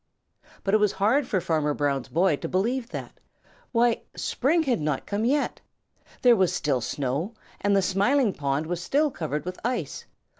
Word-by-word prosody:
But 195 - 0
it 215 - +6
was 210 -2 +2
hard 230 +8 +2
for 190 - +1
Farmer 155 -4 0
Brown's 140 -3 0
boy 170 0 +2
to - - -5
believe 235 +6 0
that. - - -7 0.5
Why, 235 -1 +2
spring 320 +6 +1
had 255 - 0
not 150 -3 -1
come 205 +2 -1
yet! 280 +4 0 0.6
There 245 -2 +7
was 185 -4 +2
still 135 -4 0
snow, 145 - -2 0.2
and 200 0 +2
the 195 - +3
Smiling 205 +5 +2
Pool 140 +1 -1
was 175 +2 -3
still 290 - +1
covered 150 - -3
with 180 0 -5
ice. 250 +2 -3
195 Hz, 175 wpm, -26 LUFS, 155-240 Hz, 0.6 s, There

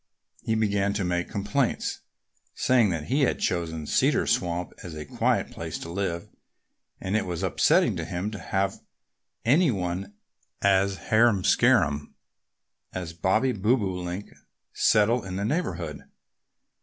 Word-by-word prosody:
He 110 - -1
began 100 -2 +1
to 100 -1 -1
make 90 -1 -1
complaints, 115 +6 -1 0.6
saying 125 -5 +3
that 80 -4 -2
he 135 - 0
had 135 - +2
chosen 80 -3 -2
Cedar - - +2
Swamp 90 0 -1
as 85 -3 -7
a 75 -1 -6
quiet - - 0
place - - -5
to 85 - -7
live 85 -2 -2 0.7
and 95 +3 -2
it 110 - +2
was 90 +1 -3
upsetting 90 -6 +3
to - - -3
him 90 +5 -3
to 105 - -6
have 95 0 -1 0.7
any 150 +8 +4
one 95 -1 -3 0.4
as 100 0 +3 0.2
harum 110 -3 +4
scarum 75 -4 +3 0.8
as 90 -3 -5
Bobby 95 +10 +2
Bobolink 95 -4 -1 0.4
settle 110 +3 +3
in 95 -1 -6
the 100 +2 -2
neighborhood. 90 - -3
95 Hz, 135 wpm, -26 LUFS, 90-110 Hz, 0.8 s, any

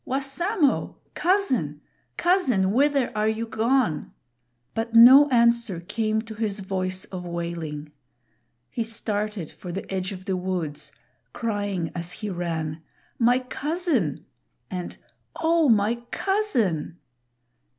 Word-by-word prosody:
Wassamo! 280 - 0 0.2
cousin! 260 - +1 0.4
cousin! 265 - +2
whither 275 +1 +2
are 215 0 +1
you 220 +1 -1
gone?" 225 - 0 0.6
But 230 +1 -3
no 265 +5 +9
answer 235 -6 +3
came 220 +5 -1
to 225 -1 -9
his 210 -2 -2
voice 185 -1 -2
of 185 -2 -7
wailing. 170 -4 -5 0.8
He 235 - -1
started 210 -5 -3
for 180 - -9
the 195 +3 -5
edge 185 +1 -2
of 185 -1 -8
the 190 - -1
woods, 180 -5 -3 0.4
crying 205 -6 -2
as 175 +1 -4
he 210 -2 -5
ran, 165 -3 -3 0.4
"My 245 +1 +4
cousin!" 265 - -1 0.5
and 180 -1 -5 0.4
"Oh, 330 -2 +3
my 225 +2 +3
cousin!" 240 - 0
215 Hz, 115 wpm, -25 LUFS, 180-255 Hz, 0.8 s, no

